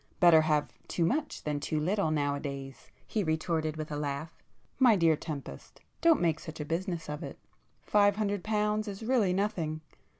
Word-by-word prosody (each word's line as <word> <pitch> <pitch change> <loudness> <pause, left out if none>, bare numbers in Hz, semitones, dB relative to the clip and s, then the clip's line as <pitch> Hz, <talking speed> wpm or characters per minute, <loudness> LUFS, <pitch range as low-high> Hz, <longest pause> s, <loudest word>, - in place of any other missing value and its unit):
"Better 170 -3 +7
have 150 -2 0
too 170 - 0
much 295 - -1
than 150 -1 -1
too 155 +1 -1
little 185 +2 +1
nowadays,"—he 140 +5 -3
retorted 160 -1 -1
with 155 0 -5
a - - -2
laugh—"My 155 - -1
dear 165 -4 +4
Tempest, 150 -3 -8 0.2
don't 330 -2 +5
make 165 -2 +1
such 160 - -9
a 150 - -3
business 170 +1 -3
of 150 0 -5
it. - - -7 0.5
Five 205 -1 +4
hundred 205 -3 -1
pounds 210 0 0
is 200 +1 -6
really 225 -5 +2
nothing. 175 -5 -1
165 Hz, 160 wpm, -30 LUFS, 155-205 Hz, 0.5 s, Better